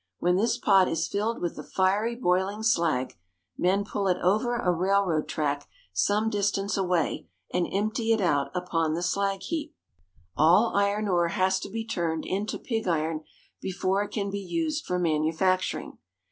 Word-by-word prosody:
When 180 +1 +2
this 225 +5 +1
pot 195 -3 +4
is 165 - -1
filled 215 +3 -1
with 175 - -2
the - - -7
fiery, 205 +5 +1
boiling 195 -1 0
slag, 165 - +1 0.4
men 195 +3 +1
pull 200 -1 -2
it 180 -1 +2
over 215 +7 +2
a 215 -7 +1
railroad 180 -2 +1
track 145 -2 -2 0.2
some 205 - +2
distance 200 -1 0
away, 180 -5 0 0.3
and 180 -1 +1
empt}^ 210 +4 -1
it 225 - +3
out 145 -7 +1
upon 165 -3 0
the 170 - -3
slag 195 +1 0
heap. 305 - -4 0.6
All 180 +9 +4
iron 200 +1 +1
ore 175 -3 +2
has 190 +1 +1
to - - -7
be 225 +2 -4
turned 170 -8 -2
into 200 +3 -2
pig 225 -5 -3
iron 160 -2 0 0.4
before 190 +1 0
it 205 - -3
can 200 -2 -3
be 200 - -3
used 310 - -2
for 180 - 0
manufacturing. 170 +3 0
190 Hz, 165 wpm, -27 LUFS, 175-205 Hz, 0.6 s, pot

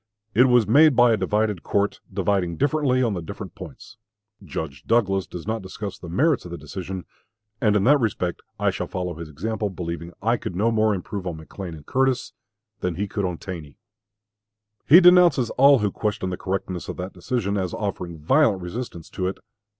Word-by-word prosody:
It 125 +5 +6
was 125 -3 +4
made 145 +7 +6
by 120 0 +6
a - - +4
divided 105 -1 0
court 100 0 0
dividing 95 -3 0
differently 140 - +2
on 115 -4 +1
the 90 - -3
different 80 - -8
points. - - -11 0.5
Judge 70 -4 -6
Douglas 95 -5 +2
does 85 - -8
not 110 +1 -2
discuss 95 +1 -7
the 85 - -9
merits 140 - +2
of 90 - -9
the 85 - -6
decision, 90 +4 -6 0.6
and 105 -3 +3
in 100 - +3
that 145 +6 +5
respect 95 -7 -1 0.2
I - - +2
shall - - -4
follow 90 -1 -3
his 85 -1 -8
example, 105 +7 -3
believing 85 -2 -5
I 115 +3 +1
could 90 - -6
no 110 +5 +2
more 110 -2 +2
improve 95 +1 -5
on 85 -3 -4
McLean 85 +2 -8
and 75 -2 -13
Curtis, 130 -1 0 0.5
than 90 -2 -2
he 100 +4 -2
could 100 0 -2
on 90 -2 -2
Taney. 80 -7 -8 1.1
He 170 +6 +10
denounces 175 -9 +6
all 140 +1 +6
who 105 -4 0
question 105 -3 -2
the - - -2
correctness 95 -1 -4
of - - -5
that 90 +1 -5
decision, 100 +2 -2
as 95 -3 -1
offering 90 -5 -4
violent 100 - +2
resistance 90 -3 -6
to 90 - -2
it. 95 - -3
100 Hz, 190 wpm, -24 LUFS, 90-115 Hz, 1.1 s, He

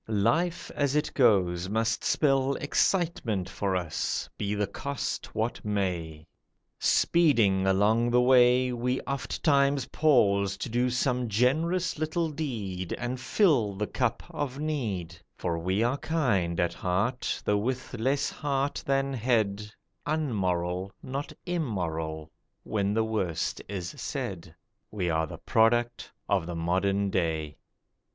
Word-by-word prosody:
Life 170 +1 +1
as 145 -1 0
it 150 - 0
goes 95 -8 +3
Must 110 +2 0
spell 135 -2 +2
excitement 145 - 0
for 95 0 -2
us, 85 -3 -2
be 105 0 -2
the 105 0 +1
cost 135 +6 -4
what 110 +2 -2
may. 90 -7 -2 0.5
Speeding 115 - +3
along 105 +5 +3
the 120 +1 +4
way, 125 0 +5
We 125 +2 -1
ofttimes 140 0 +1
pause 100 -10 +3
to 110 - -4
do 120 +2 +1
some 125 -1 0
generous 155 - +1
little 160 +1 -1
deed, 105 - -4
And 125 +1 -3
fill 125 - +2
the 105 +2 -1
cup 120 +1 -1
of 145 -5 -3
need; 110 - -3 0.2
For 85 -2 -2
we 95 +6 0
are 125 +4 0
kind 100 - 0
at 85 -1 +1
heart, 100 +10 -1
Though 105 - +2
with 130 +4 -3
less 135 +5 0
heart 140 -1 -1
than 135 0 +1
head, 105 -4 0 0.4
Unmoral, 95 - -1
not 135 +2 -4
immoral, 80 - -3 0.3
when 100 -1 -1
the 110 - +3
worst 100 -7 -2
is 90 -4 -4
said; 85 -1 -5 0.3
We 90 -5 -2
are 80 0 +1
the - - -8
product 120 +1 +1 0.2
of 95 -4 +1
the 85 - -4
modern 95 +4 0
day. 80 -5 -1
110 Hz, 130 wpm, -28 LUFS, 95-135 Hz, 0.5 s, way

